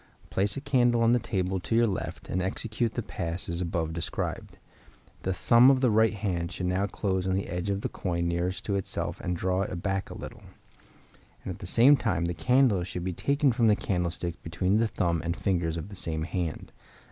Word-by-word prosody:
Place 100 +1 0
a - - -3
candle 120 -4 +3
on 115 - +5
the 120 - +4
table 95 -4 -1
to 115 - -2
your 120 +1 +5
left, 100 -4 -4
and 90 - -1
then 90 - 0
execute 110 +3 -2
the 120 - -2
pass 85 -1 -4
as 85 +1 -3
above 85 -2 -2
described. 85 -1 -4 0.6
The 95 - -1
thumb 120 +7 +6
of 135 -2 +4
the 125 -4 +4
right 110 0 +3
hand 90 -5 -2
should 90 - -4
now 95 +3 +1
close 95 -3 -1
on 95 - +1
the 95 - -1
edge 90 +3 -3
of 100 0 -1
the - - -1
coin 85 -2 -2
nearest 85 +2 -2
to 100 - -1
itself 95 - -4
and 90 0 -2
draw 95 +2 0
it 95 - -3
back 95 -1 -1
a - - -8
little; - - -9 1.0
and - - -4
at - - -13
the - - -7
same 135 +5 +6
time 105 -10 0
the 85 - -1
candle 100 - +3
should 90 0 -5
be 90 0 -2
taken 140 - +2
from 115 -1 +2
the 105 - +5
candlestick 90 -3 -2
between 90 +5 0
the 115 +1 +2
thumb 85 -5 0
and 85 +1 -2
fingers 85 -4 0
of 85 +5 -6
the 100 - -9
same 80 -3 -2
hand. 85 -1 -3
95 Hz, 220 wpm, -28 LUFS, 85-110 Hz, 1.0 s, thumb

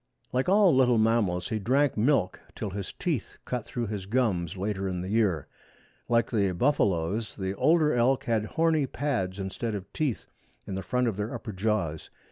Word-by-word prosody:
Like 130 +6 +1
all 195 -5 +5
little 125 -2 +4
mammals 110 -5 +1
he 110 -2 -1
drank 135 +6 +2
milk 110 -3 +2 0.2
till 105 - -4
his 100 0 -5
teeth 155 - -3
cut 125 -3 -3
through 120 -1 -3
his 100 -3 -5
gums 100 -7 0
later 95 0 -2
in 90 -1 -3
the 90 - -5
year. 100 -9 +1 0.6
Like 115 -1 +2
the 100 -5 +2
buffaloes 105 - +1
the 95 -1 -3
older 155 - +3
elk 125 +2 +2
had 110 -2 0
horny 160 +2 +1
pads 120 -10 -2
instead 100 +3 -3
of 100 -1 -8
teeth 145 -7 -1 0.4
in - - -6
the 95 - -3
front 125 +3 0
of 110 -4 -2
their 105 +2 -3
upper 115 - -6
jaws. 95 -6 -1
110 Hz, 180 wpm, -28 LUFS, 95-125 Hz, 0.6 s, all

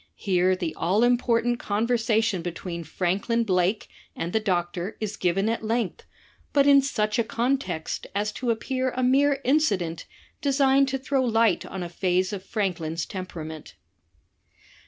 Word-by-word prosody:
Here 185 -1 +2
the 175 -3 -3
all 195 +7 +1
important 240 -1 +2
conversation 225 -2 +1
between 170 0 -5
Franklyn 195 +8 0
Blake 185 0 +1 0.3
and 170 +1 -4
the 220 - +3
doctor 180 -1 -2
is 215 -1 -3
given 190 +3 0
at 230 0 -1
length, 225 -2 -2 0.5
but 280 -1 +4
in 280 -1 +7
such 215 -6 -1
a - - +3
context 240 - -2
as 210 +1 0
to 245 +3 -4
appear 255 +3 0
a 255 - -1
mere 275 +2 +3
incident 200 - +1 0.3
designed 275 -1 +3
to 270 0 -1
throw 265 0 0
light 225 -5 +2
on 190 -2 -5
a - - -4
phase 185 +2 0
of 190 -2 -5
Franklyn's 170 -7 -2
temperament." 160 -5 -7
215 Hz, 145 wpm, -25 LUFS, 180-245 Hz, 0.5 s, in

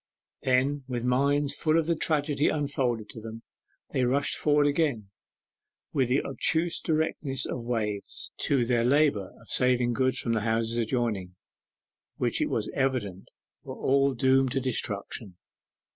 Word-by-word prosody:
Then, 135 +2 +1
with 120 -2 -3
minds 140 +3 +1
full 155 0 +1
of 165 - +2
the 170 +1 +1
tragedy 150 -2 +1
unfolded 130 -7 -1
to 110 - -10
them, 115 +1 -9 0.5
they 130 - 0
rushed 135 +3 +1
forward 150 -1 +2
again 140 -9 0 0.8
with 130 -4 +1
the 130 +3 +2
obtuse 160 +5 +1
directness 155 -4 -1
of - - -4
waves, 110 -4 -3
to 135 -4 +2
their 120 -1 +1
labour 130 -7 +2
of 115 - -19
saving 125 -1 +2
goods 130 +1 +1
from 115 - 0
the 110 - 0
houses 115 +1 0
adjoining, 110 -6 -2 0.8
which - - 0
it - - +1
was - - -1
evident 120 -9 -2 0.3
were - - -8
all 140 0 +2
doomed 130 0 +3
to 135 - +1
destruction. 105 -5 -3
130 Hz, 145 wpm, -27 LUFS, 115-140 Hz, 0.8 s, doomed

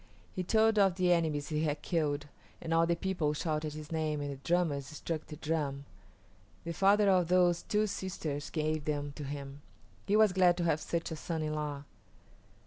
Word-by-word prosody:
He 185 - -1
told 220 +3 +3
of 195 -3 +4
the 180 -1 +2
enemies 155 -4 0
he 155 -1 0
had 150 -1 -1
killed, 150 -4 0 0.3
and 165 -1 -3
all 165 0 +4
the 170 - +2
people 170 -5 -1
shouted 155 -1 -2
his 155 0 -9
name 155 -2 -1
and 145 0 -3
the 140 - -6
drummers 150 -2 0
struck 155 +1 -5
the 150 - -8
drum. 145 -3 -2 0.8
The 170 - -4
father 200 +3 +4
of 185 -3 +4
those 180 -1 +3
two 210 0 +1
sisters 160 -8 -4
gave 155 -1 -1
them 145 -1 -2
to 150 - -6
him. 140 0 -6 0.5
He 205 - +3
was 215 -3 +5
glad 180 -2 +4
to 175 - -1
have 160 -2 +2
such 170 0 -3
a - - -2
son 160 0 -3
in 155 0 -2
law. 150 -2 -3
160 Hz, 195 wpm, -32 LUFS, 150-180 Hz, 0.8 s, was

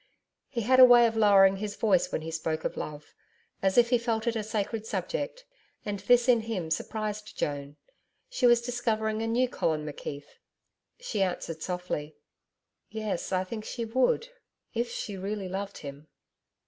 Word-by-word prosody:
He 235 - -2
had 255 +4 +4
a - - +12
way 245 -1 +8
of 225 -1 0
lowering 195 -3 +6
his 205 +1 -4
voice 200 -5 +2
when 155 - -2
he 165 - -5
spoke 160 0 -2
of - - -2
love 150 -1 -7 0.5
as 190 +2 +1
if 240 0 +5
he 245 - +4
felt 230 -1 -1
it 235 -1 0
a 220 - 0
sacred 215 +1 -3
subject; 280 - -3 0.4
and 205 -1 -3
this 240 +4 +4
in 245 -2 +5
him 210 -8 -4
surprised 215 +3 -3
Joan. 145 0 -3 0.5
She - - +2
was 240 0 +5
discovering 220 -3 -1
a 225 - -1
new 245 +3 +2
Colin 155 -10 -1
McKeith. 145 -1 -6 0.7
She 235 - -3
answered 170 -4 -2
softly. 180 -4 -4 0.7
'Yes. 215 -5 -3
I 185 0 +1
think 215 +3 -6
she 235 +1 -4
would 255 - +1 0.4
IF 235 0 -1
she 205 -3 -5
really 195 +1 -4
loved 195 +2 -5
him.' 140 +2 -9
215 Hz, 170 wpm, -28 LUFS, 180-235 Hz, 0.7 s, a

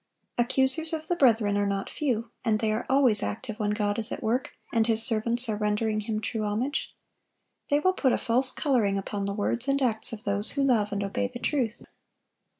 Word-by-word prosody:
Accusers 265 +6 0
of 315 0 -5
the 350 - 0
brethren 220 -8 +2
are 205 - -1
not 195 0 -3
few; 230 -6 -4
and 220 -3 0
they 215 0 -2
are 215 - -4
always 265 -6 +5
active 220 0 -6
when 210 -1 -1
God 210 0 -2
is 220 - +2
at - - -6
work, 245 +4 -2 0.2
and 225 -1 +1
His 225 -1 +9
servants 235 +2 +3
are 215 - -2
rendering 215 +1 -2
Him 215 0 -4
true 215 +1 -4
homage. 225 +8 -3 0.7
They 290 - +2
will 370 +5 +1
put 270 -8 0
a - - 0
false 255 +2 +6
coloring 230 -9 -1
upon 200 +1 -5
the 200 0 -4
words 235 +4 -2
and 275 0 0
acts 230 -5 0
of 220 -2 -9
those 200 +1 +1
who 280 - -1
love 225 -6 +1
and 200 0 -3
obey 245 +5 -3
the 250 0 -9
truth. 245 -3 -3
225 Hz, 210 wpm, -25 LUFS, 210-260 Hz, 0.7 s, His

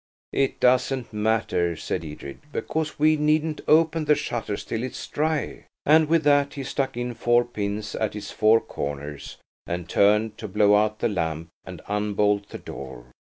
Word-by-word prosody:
"It 135 - 0
doesn't 125 -1 +2
matter," 105 -5 0
said 80 +3 -3
Edred, 75 -3 -8
"because 155 0 -3
we 155 +1 +4
needn't 155 +1 +1
open 160 0 +4
the 150 - +5
shutters 110 -6 -3
till 115 - -3
it's 130 0 -5
dry." 155 0 -2 0.2
And 155 +1 +5
with 165 -1 +3
that 145 -1 +3
he 140 - -4
stuck 135 -1 -2
in 120 0 -2
four 120 +1 +2
pins 105 -2 -4
at 110 -1 -2
its 105 -1 -6
four 110 +1 +4
corners, 70 0 -6 0.3
and 85 0 -4
turned 105 +3 +2
to 110 - -5
blow 105 +1 +3
out 105 +1 +2
the - - +3
lamp 85 -5 -2 0.2
and - - -9
unbolt 105 0 0
the - - -7
door. 65 -2 -9
110 Hz, 165 wpm, -25 LUFS, 100-140 Hz, 0.3 s, the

